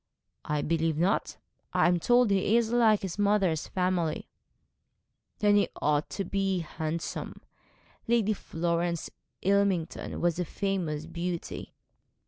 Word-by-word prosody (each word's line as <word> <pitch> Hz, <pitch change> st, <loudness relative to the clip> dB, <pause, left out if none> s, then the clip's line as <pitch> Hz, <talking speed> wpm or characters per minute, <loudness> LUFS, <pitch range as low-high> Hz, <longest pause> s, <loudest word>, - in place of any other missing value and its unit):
'I 150 Hz, -1 st, -1 dB
believe 165 Hz, -1 st, 0 dB
not. 180 Hz, +5 st, +1 dB, 0.4 s
I -, -, +4 dB
am 175 Hz, 0 st, +3 dB
told 240 Hz, +3 st, +4 dB
he 200 Hz, +3 st, +3 dB
is 230 Hz, -1 st, +1 dB
like 225 Hz, -4 st, +4 dB
his 190 Hz, +1 st, -4 dB
mother's 200 Hz, -6 st, +2 dB
family.' 180 Hz, -4 st, -1 dB, 1.1 s
'Then 205 Hz, -1 st, +4 dB
he 205 Hz, -, +2 dB
ought 150 Hz, 0 st, +1 dB
to 195 Hz, -, -3 dB
be 195 Hz, -1 st, 0 dB
handsome. 160 Hz, +1 st, -4 dB, 0.7 s
Lady 225 Hz, -2 st, +3 dB
Florence 170 Hz, -2 st, -2 dB, 0.3 s
Ilmington 195 Hz, -4 st, +1 dB
was 175 Hz, 0 st, +1 dB
a -, -, +1 dB
famous 170 Hz, -5 st, -2 dB
beauty.' 170 Hz, +1 st, -5 dB
180 Hz, 120 wpm, -29 LUFS, 165-200 Hz, 1.1 s, I